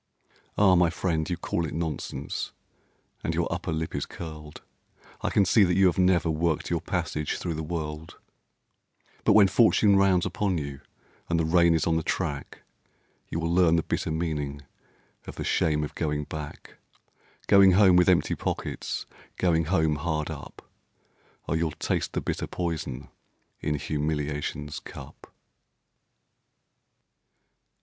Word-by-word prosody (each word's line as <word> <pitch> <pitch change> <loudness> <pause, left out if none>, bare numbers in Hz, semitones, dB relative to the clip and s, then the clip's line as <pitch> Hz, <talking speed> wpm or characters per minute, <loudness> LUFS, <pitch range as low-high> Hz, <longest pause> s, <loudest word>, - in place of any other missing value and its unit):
Ah! 100 -2 +6
my 90 -1 +4
friend, 80 -2 -1
you 90 - -1
call 85 -1 -2
it 80 - -4
nonsense, 80 -2 -4 0.7
and - - -1
your - - +1
upper - - -3
lip 80 0 -3
is 70 - -3
curled, 75 -3 -9 0.6
I - - 0
can 100 - +3
see 105 +3 +5
that 90 -2 +2
you 95 +1 +5
have 90 +1 +2
never 90 -2 +3
worked 80 0 0
your - - 0
passage 75 -1 -2
through 85 - -3
the 80 - -4
world; 80 -1 -5 1.1
But - - +5
when 105 -2 +7
fortune 100 0 +4
rounds 95 -2 +3
upon 90 0 -1
you 70 -2 -5 0.5
and 85 -1 +1
the 80 - +1
rain 85 0 +4
is 80 - +1
on 80 -1 +2
the - - 0
track, 75 -4 -3 0.7
You 80 - -2
will 85 0 -1
learn 85 -2 +4
the 80 - +1
bitter - - -2
meaning 75 -3 -3 0.6
of - - -7
the - - -4
shame 75 -1 +1
of 75 - -5
going 75 -2 -2
back; 75 0 -8 0.7
Going 100 -1 +6
home 95 -1 +6
with 90 0 +5
empty 85 -5 +3
pockets, - - -3 0.3
Going 80 -3 +2
home 80 -3 +1
hard 75 0 -2
up; - - -10 0.8
Oh, - - 0
you'll 80 0 +1
taste - - -2
the - - -1
bitter - - -3
poison 80 -6 -4 0.5
in 75 0 -1
humiliation's 75 0 -3
cup. - - -12
80 Hz, 150 wpm, -27 LUFS, 75-90 Hz, 1.1 s, when